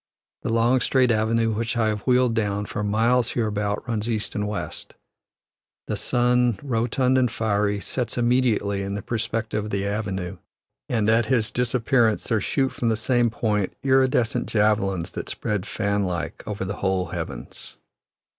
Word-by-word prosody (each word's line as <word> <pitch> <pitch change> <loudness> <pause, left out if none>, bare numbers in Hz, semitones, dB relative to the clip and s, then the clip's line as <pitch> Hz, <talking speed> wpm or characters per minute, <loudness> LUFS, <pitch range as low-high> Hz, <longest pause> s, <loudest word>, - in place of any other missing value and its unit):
The - - -3
long, 115 +3 +3
straight 125 0 +3
avenue 115 +1 +2
which 115 +2 -2
I 110 -2 +2
have 105 -1 -2
wheeled 125 -2 +4
down, 105 -2 -1
for 105 - -4
miles 115 +4 +2
hereabout 105 -1 -1
runs 115 -1 -2
east 110 -2 -1
and 105 0 -2
west. 105 - -5 0.9
The - - -2
sun, 125 -2 +2
rotund 125 +1 +1
and 125 -1 +2
fiery, 105 -3 0
sets 125 +1 -3
immediately 120 -5 +2
in 100 0 -3
the 100 - -5
perspective 110 -2 -2
of - - -5
the 100 -1 -1
avenue; 95 -3 -3 0.5
and 110 -4 +1
at 110 0 +3
his 115 -5 +1
disappearance 120 -2 +2
there 110 -2 +1
shoot 135 +5 0
from 120 - 0
the 110 - +2
same 120 +1 +2
point 105 -4 -1
iridescent 130 -3 +2
javelins 105 -5 +1
that - - -6
spread, 105 -3 -3
fan 100 -1 0
like, 85 -3 -3
over 100 -3 -3
the 100 +2 -4
whole 95 -1 0
heavens. 80 -9 -7
110 Hz, 160 wpm, -24 LUFS, 105-120 Hz, 0.9 s, wheeled